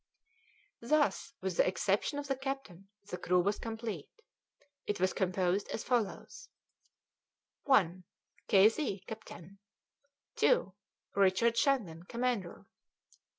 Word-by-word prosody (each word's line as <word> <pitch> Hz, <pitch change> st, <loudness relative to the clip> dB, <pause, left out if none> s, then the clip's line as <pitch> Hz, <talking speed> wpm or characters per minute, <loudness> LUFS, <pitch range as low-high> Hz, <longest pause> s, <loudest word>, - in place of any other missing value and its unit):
Thus, 280 Hz, +2 st, +1 dB
with 185 Hz, -2 st, -3 dB
the -, -, +4 dB
exception 195 Hz, +8 st, 0 dB
of 290 Hz, -, -3 dB
the 270 Hz, -, 0 dB
captain, 265 Hz, -9 st, -6 dB, 0.2 s
the 180 Hz, -, -5 dB
crew 180 Hz, +1 st, +2 dB
was 200 Hz, +3 st, +1 dB
complete. 225 Hz, -8 st, -5 dB, 0.8 s
It 205 Hz, -, -1 dB
was 185 Hz, +1 st, +2 dB
composed 185 Hz, +1 st, 0 dB
as 225 Hz, -, -4 dB
follows: 245 Hz, -, -2 dB, 1.2 s
1. 185 Hz, -, +3 dB, 0.4 s
K. 195 Hz, +1 st, +7 dB
Z., 220 Hz, -5 st, -2 dB
captain; 200 Hz, -3 st, -10 dB, 0.8 s
2. 475 Hz, -, +3 dB, 0.4 s
Richard 200 Hz, +4 st, +3 dB
Shandon, 230 Hz, -, +1 dB
commander; 235 Hz, -1 st, -3 dB, 0.5 s
3. -, -, -25 dB
205 Hz, 110 wpm, -32 LUFS, 185-250 Hz, 1.2 s, K